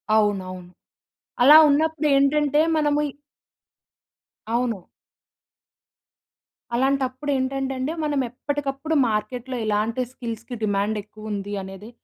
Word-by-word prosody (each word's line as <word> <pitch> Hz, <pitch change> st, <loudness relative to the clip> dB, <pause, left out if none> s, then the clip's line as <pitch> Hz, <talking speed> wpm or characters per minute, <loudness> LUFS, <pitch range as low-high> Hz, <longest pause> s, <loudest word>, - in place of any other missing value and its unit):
అవునవును. 185 Hz, -4 st, 0 dB, 0.7 s
అలా 300 Hz, +4 st, +10 dB
ఉన్నప్పుడేంటంటే 295 Hz, -1 st, +2 dB
మనము 295 Hz, -1 st, +2 dB
ఇ -, -, -8 dB, 1.4 s
అవును. 235 Hz, -6 st, -1 dB, 1.9 s
అలాంటప్పుడేంటంటే 270 Hz, 0 st, 0 dB
అండి. 285 Hz, +5 st, -2 dB
మనం 290 Hz, -2 st, 0 dB
ఎప్పటికప్పుడు 285 Hz, +4 st, -3 dB
మార్కెట్‌లో 245 Hz, +4 st, -3 dB
ఇలాంటి 215 Hz, +4 st, 0 dB
స్కిల్స్‌కి 235 Hz, -1 st, -7 dB
డిమాండ్ 205 Hz, +1 st, 0 dB
ఎక్కువ 215 Hz, 0 st, -10 dB
ఉంది 200 Hz, 0 st, -4 dB
అనేది. 195 Hz, +3 st, -10 dB
255 Hz, 85 wpm, -23 LUFS, 215-285 Hz, 1.9 s, అలా